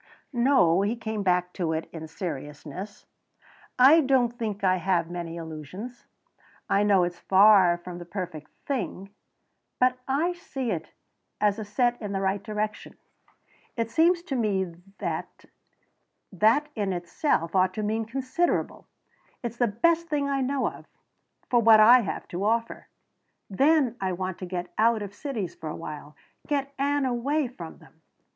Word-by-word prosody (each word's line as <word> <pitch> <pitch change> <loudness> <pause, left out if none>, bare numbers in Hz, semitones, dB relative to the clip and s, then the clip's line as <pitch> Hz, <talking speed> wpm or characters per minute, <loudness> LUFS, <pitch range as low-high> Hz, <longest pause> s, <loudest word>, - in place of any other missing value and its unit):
"No," 235 -9 +4
he 205 +4 0
came 220 -2 -4
back 180 -2 +1
to 165 -3 -1
it 160 0 -3
in 160 -1 -7
seriousness, 160 +3 -7 0.7
"I 275 +6 +7
don't 255 -3 +2
think 215 -3 -4
I 185 -1 +3
have 175 -2 0
many 170 -1 -5
illusions. 165 - -8 0.6
I 200 - +2
know 200 -3 +4
it's 175 0 -3
far 190 -3 +6
from 175 0 -9
the 175 - -8
perfect 175 -4 -6 0.2
thing, 195 -7 -4 0.7
but 255 0 +3
I 310 +7 +1
see 270 -8 -4
it 160 -4 -4 0.5
as 210 0 0
set 240 +3 +1
in 205 -2 -4
the 195 - -1
right 195 +1 0
direction. 215 +1 -4 0.8
It 230 -1 -2
seems 340 +6 +3
to 295 -7 -4
me 195 -7 0 0.2
that - - -5 0.9
that, 220 - +3
in 205 -5 -1
itself, 175 - -1
ought 185 0 +3
to 215 - -2
mean 220 +2 -1
considerable. 265 +8 -1 0.6
It's 235 -1 -4
the 240 - +2
best 335 +11 +1
thing 290 -3 -1
I 275 -1 0
know 270 +1 0
of - - -8 0.6
for 240 - +3
what 220 -1 +7
I 235 +4 +8
have 200 -9 -4
to 180 +3 -4
offer. 230 +2 -1 0.6
Then 270 +2 +3
I 190 -1 -1
want 185 0 -4
to 185 - -6
get 175 -1 -5
out 225 -1 +3
of 200 -1 -8
cities 220 - -4
for 160 - -7
awhile 150 -1 -8 0.3
get 280 -1 -1
Ann 285 0 +1
away 265 +4 0
from 175 -10 -10
them." - - -21
210 Hz, 155 wpm, -26 LUFS, 180-255 Hz, 0.9 s, I